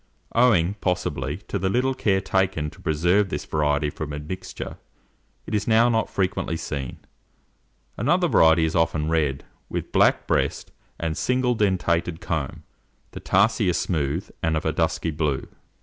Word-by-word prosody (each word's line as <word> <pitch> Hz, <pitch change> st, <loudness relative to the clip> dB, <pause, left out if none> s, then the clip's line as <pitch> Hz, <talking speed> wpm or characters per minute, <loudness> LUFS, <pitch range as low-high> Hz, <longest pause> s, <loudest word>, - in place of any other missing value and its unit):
Owing, 105 Hz, -7 st, +4 dB
possibly, 80 Hz, -6 st, -1 dB
to 100 Hz, -, -2 dB
the 95 Hz, +1 st, 0 dB
little 125 Hz, +5 st, +1 dB
care 100 Hz, -6 st, +1 dB
taken 95 Hz, -6 st, 0 dB
to -, -, -17 dB
preserve 90 Hz, +6 st, +2 dB
this -, -, -4 dB
variety 75 Hz, -1 st, 0 dB
from 75 Hz, 0 st, -6 dB
admixture, 75 Hz, +6 st, -6 dB, 0.7 s
it -, -, -7 dB
is 105 Hz, -1 st, 0 dB
now 115 Hz, +1 st, +5 dB
not 115 Hz, -1 st, +1 dB
frequently 95 Hz, -3 st, -1 dB
seen. 70 Hz, -5 st, -5 dB, 1.0 s
Another -, -, +2 dB
variety 80 Hz, 0 st, +5 dB
is 80 Hz, -, -2 dB
often 80 Hz, -2 st, +1 dB
red, 75 Hz, -4 st, 0 dB, 0.3 s
with -, -, -3 dB
a -, -, -29 dB
black -, -, +3 dB
breast -, -, -1 dB, 0.3 s
and 80 Hz, -1 st, -2 dB
single 125 Hz, +3 st, +1 dB
dentated 90 Hz, -6 st, 0 dB
comb. 75 Hz, -5 st, -3 dB, 0.5 s
The -, -, -8 dB
tarsi 105 Hz, +1 st, +2 dB
are -, -, +2 dB
smooth, 80 Hz, -1 st, -1 dB
and 80 Hz, -1 st, +1 dB
of 80 Hz, -, -4 dB
a 80 Hz, -, +1 dB
dusky 80 Hz, 0 st, 0 dB
blue. 75 Hz, -3 st, -1 dB
85 Hz, 155 wpm, -24 LUFS, 75-100 Hz, 1.0 s, now